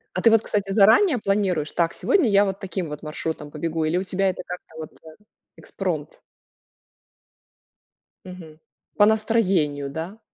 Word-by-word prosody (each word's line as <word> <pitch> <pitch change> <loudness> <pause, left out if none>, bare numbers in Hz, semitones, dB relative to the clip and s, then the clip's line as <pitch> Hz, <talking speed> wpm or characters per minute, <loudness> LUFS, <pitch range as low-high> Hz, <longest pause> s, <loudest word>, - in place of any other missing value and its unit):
А 185 - -1
ты 230 - +6
вот, 225 - +5
кстати, 200 -3 -2
заранее 225 - +5
планируешь: 195 -7 0
"Так, 170 -1 0
сегодня 360 - +2
я 200 0 +4
вот 195 0 -4
таким 190 -3 -4
вот 150 +1 -8
маршрутом 155 -1 -5
побегу", 160 +1 -2
или 160 +3 0
у 185 - -1
тебя 195 +1 0
это 185 - -4
как-то 180 -2 -9
вот, 155 -1 -8
э 160 -1 -13 0.4
экспромт? - - -5 2.1
Мгм. 170 -4 -11 0.4
По 205 - +6
настроению, 195 -10 +1
да? 170 +8 -6
185 Hz, 150 wpm, -23 LUFS, 160-205 Hz, 2.1 s, ты